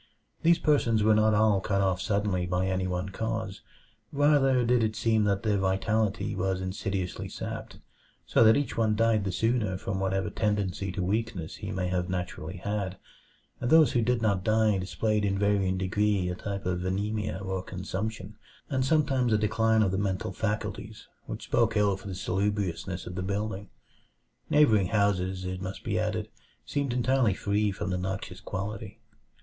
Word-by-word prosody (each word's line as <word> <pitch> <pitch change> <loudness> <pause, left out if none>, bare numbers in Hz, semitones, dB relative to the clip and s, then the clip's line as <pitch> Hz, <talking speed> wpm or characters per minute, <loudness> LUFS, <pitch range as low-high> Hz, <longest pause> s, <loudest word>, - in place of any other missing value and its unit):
These 170 +1 +5
persons 120 -9 +2
were 110 +1 +5
not 110 0 +4
all 105 -2 +3
cut 100 0 0
off 95 -2 +1
suddenly 100 -4 0
by 90 +1 0
any 95 0 -1
one 90 +1 -2
cause; 110 0 -3 0.5
rather 140 -3 +3
did 120 0 +3
it 110 0 0
seem 110 -1 +2
that 100 -1 0
their 105 -3 +1
vitality 100 +3 0
was 95 0 -1
insidiously 95 0 -3
sapped, - - -6 0.5
so - - +4
that 110 0 +6
each 145 - -2
one 110 -2 +2
died 110 -2 +2
the 95 - -1
sooner 110 -1 0
from 95 +1 -3
whatever 95 +1 -1
tendency 100 -4 -1
to 90 - -2
weakness 95 -4 -2
he 105 - -6
may 95 -3 -2
have 90 0 -1
naturally 90 -1 -4
had. 100 0 -3 0.6
And 120 - -2
those 160 -2 +6
who 120 - +2
did 120 0 +1
not 100 -4 +1
die 110 -2 +3
displayed 105 +3 0
in 100 -1 +1
varying 100 -2 +1
degree 95 0 +1
a - - -1
type 100 +1 -5
of 90 -1 -1
anemia 100 +3 -2
or 95 -1 -3
consumption, 95 +3 -5 0.3
and 130 -1 +1
sometimes 135 -4 +2
a 110 - +4
decline 110 +1 +2
of 95 - +1
the 95 - -1
mental 95 -2 -1
faculties, 105 +2 -4 0.2
which - - -6
spoke - - +1
ill 100 -2 +3
for 95 +1 -11
the 95 - -4
salubriousness 95 -2 -2
of 90 - -6
the 95 - -3
building. 100 +1 -3 0.8
Neighboring 140 -11 +4
houses, 95 -3 0
it 90 0 -4
must 95 0 -6
be - - -1
added, - - -1 0.4
seemed 140 -3 -1
entirely 125 -3 +2
free 105 +1 0
from 100 0 -4
the 90 - -1
noxious 95 0 -4
quality. 100 +2 -5
100 Hz, 175 wpm, -28 LUFS, 95-110 Hz, 0.8 s, that